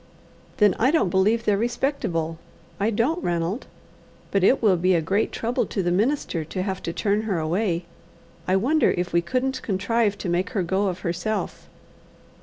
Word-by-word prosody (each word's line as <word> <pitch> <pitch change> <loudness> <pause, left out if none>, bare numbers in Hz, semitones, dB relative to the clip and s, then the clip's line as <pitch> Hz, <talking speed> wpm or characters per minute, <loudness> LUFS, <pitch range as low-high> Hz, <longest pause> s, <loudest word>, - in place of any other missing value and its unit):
"Then 210 -2 +5
I 255 - +4
don't 290 - +2
believe 215 +5 +2
they're 205 -1 +3
respectable. 220 - -1 0.4
I 205 +3 +2
don't, 250 - 0
Ranald. 175 +6 -1 0.6
But 195 -2 +1
it 260 - +5
will 210 -5 +4
be 180 +1 +2
a - - +3
great 190 +7 0
trouble 240 +3 -1
to 195 - -2
the 175 - +1
minister 205 - 0
to 185 +4 -4
have 190 -1 -3
to 170 - -3
turn 205 +4 0
her 215 -5 -1
away. 170 +2 -1 0.6
I 185 - +3
wonder 275 +11 +3
if 180 0 -2
we 170 - +4
couldn't 260 +8 -1
contrive 205 +1 0
to 195 - -5
make 175 +2 0
her 190 - +2
go 190 +4 0
of 185 -1 -3
herself. 200 +5 -3
195 Hz, 180 wpm, -24 LUFS, 175-230 Hz, 0.6 s, Then